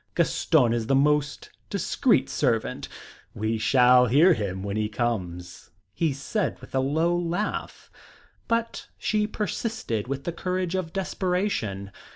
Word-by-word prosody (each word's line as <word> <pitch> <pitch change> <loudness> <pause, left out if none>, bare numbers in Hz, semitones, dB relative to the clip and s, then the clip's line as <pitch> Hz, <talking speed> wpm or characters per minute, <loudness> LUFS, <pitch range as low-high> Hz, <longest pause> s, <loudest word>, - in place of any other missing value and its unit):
Gaston 130 -8 +3
is 115 -2 -2
the 135 - +3
most 150 +1 +1 0.2
discreet - - +1
servant. - - -1 0.5
We 110 +1 -1
shall 125 +2 +5
hear 155 +10 +6
him 95 - -3
when 100 0 -3
he 110 0 -1
comes," 90 -6 -4 0.2
he 160 +7 0
said 150 +10 -2
with - - -14
a 135 - +2
low 160 +6 +1
laugh. 175 +4 -3 0.6
But 230 0 -1
she 210 -1 0
persisted 210 - -3
with 135 +1 -4
the 170 - -2
courage 180 +1 -2
of 185 -3 -2
desperation. 180 - -2
140 Hz, 135 wpm, -26 LUFS, 110-180 Hz, 0.6 s, hear